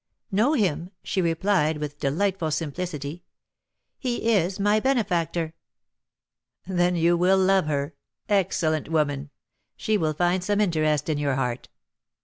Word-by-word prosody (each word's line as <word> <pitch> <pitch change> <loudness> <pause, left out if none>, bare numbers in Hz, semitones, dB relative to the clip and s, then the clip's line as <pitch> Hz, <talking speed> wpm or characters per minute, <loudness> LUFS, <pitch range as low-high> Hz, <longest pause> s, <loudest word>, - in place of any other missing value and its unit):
'Know 220 +10 +3
him!' 180 - 0
she 190 - -1
replied, 165 -2 +1
with 150 -1 -6
delightful 170 +4 0
simplicity; 155 0 -4 0.8
'he 240 -3 0
is 190 -1 +1
my 205 +2 +3
benefactor.'" 175 -10 0 1.1
"Then 180 -1 +1
you 170 +1 +3
will 180 +3 +3
love 190 -3 +3
her. 145 +1 -1 0.3
Excellent 165 -7 +1
woman! 145 -3 0 0.5
she 215 -1 0
will 155 -2 0
find 175 +2 +1
some 205 +2 0
interest 155 -6 +1
in 155 -2 0
your 140 -2 0
heart." 125 -2 -3
170 Hz, 130 wpm, -25 LUFS, 150-195 Hz, 1.1 s, Know